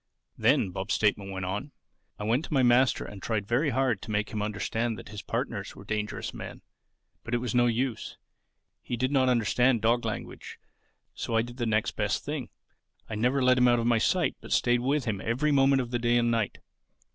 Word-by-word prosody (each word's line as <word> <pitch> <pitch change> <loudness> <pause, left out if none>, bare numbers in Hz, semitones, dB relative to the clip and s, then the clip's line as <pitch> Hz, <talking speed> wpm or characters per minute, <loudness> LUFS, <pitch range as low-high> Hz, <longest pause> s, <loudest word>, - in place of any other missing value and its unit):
"Then," 95 - +2
Bob's 95 +3 -2
statement 105 -2 +1
went 95 -1 -4
on, 105 +10 -4 0.4
"I - - -6
went 115 +7 +1
to - - -6
my 130 - +4
master 125 +1 +3
and 100 -2 -9
tried 105 -2 -2
very 130 +7 +2
hard 130 -5 +1
to - - -10
make 105 0 -1
him 105 - -3
understand 110 +2 -2
that - - -10
his 105 -1 -7
partners - - -4
were - - -11
dangerous 105 0 -3
men. - - -8 0.6
But 120 - -2
it - - +3
was 120 -2 -3
no 120 0 +4
use. 120 0 -2 0.6
He 120 - -4
did 130 +3 0
not 130 -2 +3
understand 120 +1 +2
dog 120 +2 +3
language. - - -6 0.6
So 115 - -3
I 115 - +3
did 120 +1 -9
the 120 -2 -1
next 110 +1 +1
best 105 -1 -2
thing: 145 -4 -4 0.6
I - - -3
never 125 +5 +1
let 125 0 +4
him 125 - +5
out 120 0 +4
of 115 - -1
my 120 -1 +3
sight 180 +9 +1
but - - -11
stayed 120 0 +3
with 135 +2 0
him 105 -5 -2
every 130 +7 +1
moment 135 -1 +4
of 120 - -9
the 120 - 0
day 120 0 +2
and 120 0 +2
night. 115 -4 -1
120 Hz, 215 wpm, -28 LUFS, 110-125 Hz, 0.6 s, him